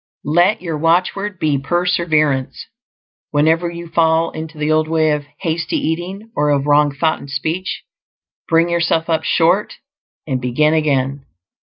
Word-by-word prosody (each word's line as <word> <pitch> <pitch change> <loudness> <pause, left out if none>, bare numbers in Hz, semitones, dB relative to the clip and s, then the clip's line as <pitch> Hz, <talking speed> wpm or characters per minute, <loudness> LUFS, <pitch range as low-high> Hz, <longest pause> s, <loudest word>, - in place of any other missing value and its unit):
Let 175 +8 +2
your 165 -4 -3
watchword 185 +5 0
be 155 -5 0
perseverance; 155 -4 0 0.6
whenever 160 +4 +2
you 170 0 -8
fall 165 0 +2
into 160 0 -8
the 150 +1 -1
old 155 0 +2
way 160 -1 +2
of 150 -1 -2 0.2
hasty 165 -2 -2
eating, 185 +7 -3
or 150 0 +1
of 140 -1 +1
wrong 145 0 +4
thought 155 +3 0
and 140 - -11
speech, 160 +7 -3 0.7
bring 165 +1 +4
yourself 170 -1 0
up 160 - +1
short 175 +5 +2 0.5
and 130 -4 -2
begin 150 +5 +2
again. 140 -3 0
160 Hz, 145 wpm, -18 LUFS, 150-170 Hz, 0.7 s, wrong